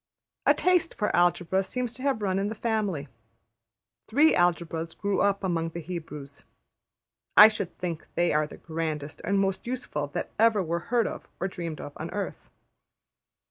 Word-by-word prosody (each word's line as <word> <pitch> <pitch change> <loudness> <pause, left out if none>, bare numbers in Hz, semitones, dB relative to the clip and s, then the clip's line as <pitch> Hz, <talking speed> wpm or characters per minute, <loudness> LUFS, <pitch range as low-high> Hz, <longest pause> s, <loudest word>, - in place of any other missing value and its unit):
A - - +7
taste 360 -2 +2
for 210 -3 0
Algebra 175 +1 +3
seems 245 +4 -3
to 255 - -11
have 265 -6 0
run 190 -1 +1
in 200 - 0
the 220 - -4
family. 210 -10 -1 1.0
Three 295 +7 +5
Algebras 165 -2 0
grew 200 -1 0
up 200 -1 +2
among 165 -3 0
the 170 - -6
Hebrews; 150 -4 -7 0.9
I 210 - +12
should 210 -5 -4
think 170 -3 -4
they 175 0 +2
are 150 0 +2
the - - -11
grandest 160 -3 -4
and 200 - +1
most 195 +2 0
useful 240 - -3
that - - -3
ever 220 -3 +4
were 170 0 -1
heard 235 -2 +3
of - - -5
or 190 - 0
dreamed 170 -4 -5
of 145 - -7
on - - -5
earth. - - -5
185 Hz, 170 wpm, -27 LUFS, 165-215 Hz, 1.0 s, I